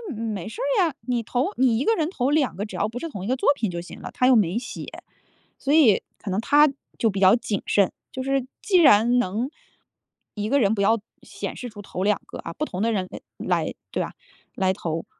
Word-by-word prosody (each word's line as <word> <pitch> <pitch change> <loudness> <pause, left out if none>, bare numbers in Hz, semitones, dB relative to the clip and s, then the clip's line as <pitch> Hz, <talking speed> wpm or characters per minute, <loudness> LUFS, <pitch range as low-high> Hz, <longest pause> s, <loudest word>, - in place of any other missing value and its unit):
得 - - -8
嗯， 225 -1 -2
没 195 -1 -5
事 455 - -7
儿 - - +2
呀， 315 -6 -2
你 245 -2 +1
投 250 - -1
你 250 -3 +3
一 265 - -1
个 450 - +4
人 320 -4 0
投 270 -7 -1
2 295 -3 +2
个， 205 - -3
只 210 - -9
要 205 - 0
不 225 +3 -7
是 330 - -4
同 200 - -7
一 - - -4
个 255 - +1
作 265 - +1
品 220 -6 -1
就 175 -1 -4
行 175 - -11
了， - - -6
它 250 - +1
又 260 - +6
没 200 -3 +2
写。 235 +1 -6 0.7
所 275 - -1
以 280 -11 +6 0.2
可 200 - -6
能 190 +3 0
他 295 +5 +5 0.3
就 225 - +2
比 195 - -3
较 190 +2 +7
谨 220 -4 -2
慎， 200 -2 +3 0.2
就 260 - -4
是 270 -1 0 0.2
既 385 -4 +3
然 240 -6 +6
能 225 +4 -1 0.8
一 210 0 -3
个 280 - +3
人 210 -4 +3
不 200 - -1
要 225 +3 +3 0.2
显 - - -6
示 250 - -6
出 210 -2 -10
投 185 -1 -4
2 210 +1 +2
个 - - -9
啊， - - -6
不 305 - -2
同 185 -9 -5
的 230 +2 +2
人 190 -4 -1
哎 - - -8 0.2
来 - - -1 0.2
对 - - -1
吧， - - -7 0.4
来 190 -1 +1
投， 165 -4 -4
230 Hz, 260 characters per minute, -24 LUFS, 200-270 Hz, 0.8 s, 较